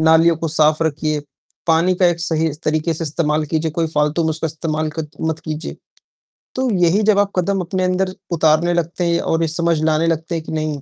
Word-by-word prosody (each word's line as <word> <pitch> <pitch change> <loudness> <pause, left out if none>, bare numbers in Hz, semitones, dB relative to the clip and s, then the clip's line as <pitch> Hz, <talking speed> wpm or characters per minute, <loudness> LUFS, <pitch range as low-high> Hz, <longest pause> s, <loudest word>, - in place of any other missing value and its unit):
नालियों 160 +1 +5
को 165 +1 -3
साफ़ 155 0 +2
रखिए, 155 -1 -1 0.5
पानी 170 +2 +3
का 180 0 +3
एक 170 -1 +1
सही 160 -1 0 0.2
तरीक़े 155 +1 0
से 165 - -4
इस्तेमाल 155 0 0
कीजिए, 160 +2 -1
कोई 165 +1 -1
फ़ालतू 150 +1 0
में 160 - +1
उसका 160 +1 -2
इस्तेमाल 155 0 -2
कत 155 -1 -6
मत 160 -1 -1
कीजिए। 155 0 -5 0.8
तो 260 -1 0
यही 175 +5 +3
जब 205 -1 +4
आप 200 0 +2
कदम 195 +2 +1
अपने 185 +1 -2
अंदर 185 +1 0 0.2
उतारने 165 +1 +3
लगते 170 +1 -1
हैं 170 - +2
और 165 0 0
ये 165 - +2
समझ 165 0 0
लाने 160 +1 +2
लगते 165 +1 -1
हैं 160 - -3
कि - - -8
नहीं, 155 -2 -2
160 Hz, 210 wpm, -19 LUFS, 155-170 Hz, 0.8 s, नालियों